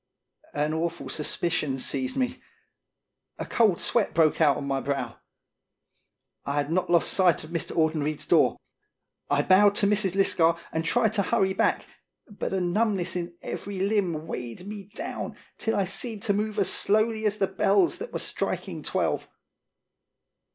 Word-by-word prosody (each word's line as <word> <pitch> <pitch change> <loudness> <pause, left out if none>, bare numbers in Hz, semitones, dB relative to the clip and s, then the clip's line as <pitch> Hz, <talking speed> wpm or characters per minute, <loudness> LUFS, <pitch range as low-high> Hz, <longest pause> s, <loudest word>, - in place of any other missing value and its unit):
An 150 +1 0
awful 165 +1 -3
suspicion 150 -3 -1
seized 130 0 -3
me; 255 0 -1 1.0
a - - -4
cold 215 -7 +2
sweat 230 -4 +1
broke 160 -1 +3
out 145 -3 +5
on - - -5
my 135 -1 0
brow. 130 -4 -3 1.3
I 140 - -3
had 145 +1 -1
not 180 +2 0
lost 170 -1 +3
sight 180 -5 +3
of 155 - -11
Mr. 170 0 -3
Audenried's 155 -2 0
door. - - +3 0.7
I 145 0 +2
bowed 200 +3 +5
to 205 - +3
Mrs. 200 -2 +2
Lisgar 170 -4 +3
and 160 - -1
tried 220 +4 +2
to 210 - +2
hurry 190 0 +1
back, - - +1 0.4
but 210 - -5
a 190 - 0
numbness 185 0 0
in 175 -1 -4
every 200 -1 -5
limb 190 -6 0
weighed 125 +2 -6
me 205 -1 -7
down - - -5 0.2
till 225 - 0
I 200 - +2
seemed 205 +3 -4
to 200 - +2
move 215 +1 -2
as 200 - +1
slowly 220 +1 +1
as 210 0 -1
the 200 - +2
bells 190 -1 +2
that 465 +3 -6
were - - -2
striking - - -3
twelve. - - -1
185 Hz, 160 wpm, -26 LUFS, 155-205 Hz, 1.3 s, out